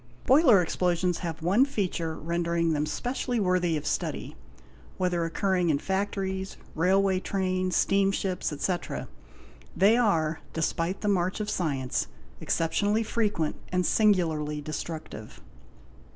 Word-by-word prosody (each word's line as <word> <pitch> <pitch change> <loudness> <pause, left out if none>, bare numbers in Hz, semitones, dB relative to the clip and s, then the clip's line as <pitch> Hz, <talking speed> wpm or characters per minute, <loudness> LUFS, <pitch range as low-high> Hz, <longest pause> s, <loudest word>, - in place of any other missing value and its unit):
Boiler 260 - +6
explosions 180 +1 0
have 165 -3 -5
one 195 +9 +4
feature 185 - -2
rendering 170 0 0
them 150 0 0
specially 245 +6 -2
worthy 180 -4 +1
of 150 - -6
study; 155 - -3 0.6
whether 180 -2 0
occurring 180 +1 0
in 150 - +3
factories, 190 +1 -2 0.2
railway 190 +3 +2
trains, 185 -2 -1
steamships, 195 -2 +1
etc.,. 175 +4 -3 0.7
they 200 +6 +5
are, 165 -10 +1
despite 165 +3 -1
the 210 - -2
march 185 -1 +1
of 210 0 -2
science, 135 -7 -1 0.3
exceptionally 205 +7 +1
frequent 210 -8 -1
and 180 0 +1
singu 205 -3 +4
larly 150 -1 -3
destructive. 155 -7 -6
180 Hz, 120 wpm, -27 LUFS, 165-195 Hz, 0.7 s, Boiler